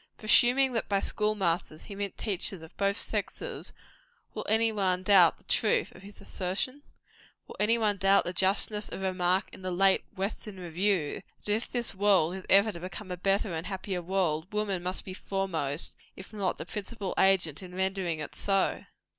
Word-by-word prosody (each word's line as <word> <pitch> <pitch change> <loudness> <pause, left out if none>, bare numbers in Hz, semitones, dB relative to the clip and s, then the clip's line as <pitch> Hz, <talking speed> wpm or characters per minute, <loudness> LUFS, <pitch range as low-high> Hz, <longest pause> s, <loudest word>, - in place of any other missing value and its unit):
Presuming 245 +4 +4
that 225 - -2
by 200 -1 +2
school 210 +1 +1
masters 170 -5 -1
he 210 - -9
meant 200 -1 -5
teachers 195 -4 -1
of 160 - -14
both 200 +1 0
sexes, - - -3 0.6
will - - -5
any 225 +1 +3
one 185 -3 0
doubt 185 -4 +6
the - - -26
truth 215 - +1
of - - -15
his 200 +1 -13
assertion? 195 +10 -3 0.6
Will - - -11
any 225 +3 +3
one 210 -3 +1
doubt 195 +1 +4
the 175 - -4
justness 200 +3 +2
of 195 - -6
a 190 - +1
remark 185 0 +1
in - - -12
the 185 - -3
late 190 +2 +3
"Western 195 0 -5
Review," 175 -2 -1 0.2
that 205 - +1
if 225 +3 -2
this 240 -2 -1
world 190 -4 +3
is 190 0 -8
ever 200 +3 +5
to 170 - -7
become 185 +2 -8
a - - -2
better 195 +1 0
and 160 +2 -4
a - - -5
happier 190 -1 -4
world, 175 -2 -1
woman 210 -3 -1
must 180 +1 -3
be 185 - -6
foremost, 175 -7 -2 0.2
if 190 +3 -12
not 200 -3 -1
the - - -6
principal 205 -1 -5
agent 185 -6 +3
in 180 -1 -10
rendering 190 -3 -1
it 150 - -6
so? 195 -1 0
195 Hz, 190 wpm, -29 LUFS, 180-205 Hz, 0.6 s, doubt